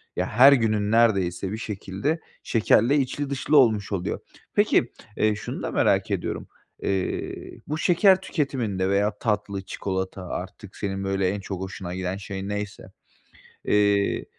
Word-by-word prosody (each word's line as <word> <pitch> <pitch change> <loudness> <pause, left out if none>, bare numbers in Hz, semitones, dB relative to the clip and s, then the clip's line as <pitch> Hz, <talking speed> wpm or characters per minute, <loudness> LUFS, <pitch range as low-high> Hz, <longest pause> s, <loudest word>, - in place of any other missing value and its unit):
ya, - - 0
her 135 +6 +7
günün 110 -4 +1
neredeyse 95 -5 +2
bir 110 - -3
şekilde 105 - -3 0.2
şekerle 115 +4 +3
içli 140 +1 -1
dışlı 140 +2 +2
olmuş 110 -6 +4
oluyor. 90 -2 -2 0.3
Peki, - - +3 0.3
eee, 110 -1 +2
şunu 105 - -6
da - - -2
merak - - +2
ediyorum. - - -3 0.4
Eee, 95 -2 -3
bu 155 +1 -2
şeker 190 +3 +4
tüketiminde 115 - -1
veya 105 +1 +1
tatlı, 105 -3 -1
çikolata 95 -1 -4
artık 95 +2 -7
senin, 95 -1 -3
böyle, 95 -1 0
en 100 +1 -2
çok 95 -1 -6
hoşuna 95 -2 -6
giden 95 +1 -3
şey 100 -1 -6
neyse, 105 0 -5 0.7
eee, 100 -1 +2
105 Hz, 140 wpm, -25 LUFS, 95-115 Hz, 0.7 s, her